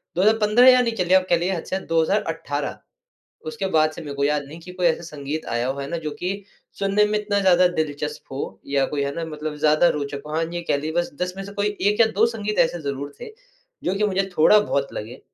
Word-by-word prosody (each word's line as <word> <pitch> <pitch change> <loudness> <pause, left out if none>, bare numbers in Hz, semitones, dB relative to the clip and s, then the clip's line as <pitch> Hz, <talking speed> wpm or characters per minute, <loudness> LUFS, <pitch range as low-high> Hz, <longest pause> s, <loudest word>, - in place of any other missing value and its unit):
2015 215 +5 +4
या 255 0 +7
नहीं 235 -2 0
चलिए 180 -2 +2
आप 185 - 0
कह - - +5
लीजिए, 180 +3 -1
हद 165 - -5
से - - -3
हद 190 - -4
2018 165 -3 -1 0.7
उसके 155 +5 -3
बाद 155 0 +4
से - - -9
मेरे 145 -2 -6
को 140 - 0
याद 150 0 +1
नहीं 155 +4 -10
कि 180 +2 -10
कोई 180 -1 0
ऐसा 170 0 +1
संगीत 150 -1 -5
आया 120 +1 -1
हो, 135 +1 -3
है 140 - -4
ना? 170 - -1
जो 155 -2 -4
कि 190 +6 -4 0.4
सुनने 200 +1 +3
में 210 0 0
इतना 205 -1 -1
ज़्यादा 185 -2 +5
दिलचस्प 150 -2 -4
हो 115 -8 -5
या 140 -1 +1
कोई 145 0 -2
है 140 - -2
ना 165 - -2
मतलब 155 -1 -5
ज़्यादा 155 +3 +4
रोचक 140 -2 -3
हो। 150 - -7
हाँ 165 +1 +1
ये 175 - -3
कह - - +3
ली 155 +2 -4
बस 175 +1 0
10 180 0 -1
में 195 - -5
से 200 - -9
कोई 205 +1 0
1 205 +3 +2
या 230 - +7
2 220 +3 +5
संगीत 215 -2 -3
ऐसे 170 +1 +2
ज़रूर 140 0 -4
थे, - - -7 0.5
जो 185 - 0
कि 205 +2 0
मुझे 195 -1 0
थोड़ा 160 +7 +6
बहुत 140 -9 -1
लगे। 115 +5 -7
165 Hz, 250 wpm, -23 LUFS, 150-195 Hz, 0.7 s, या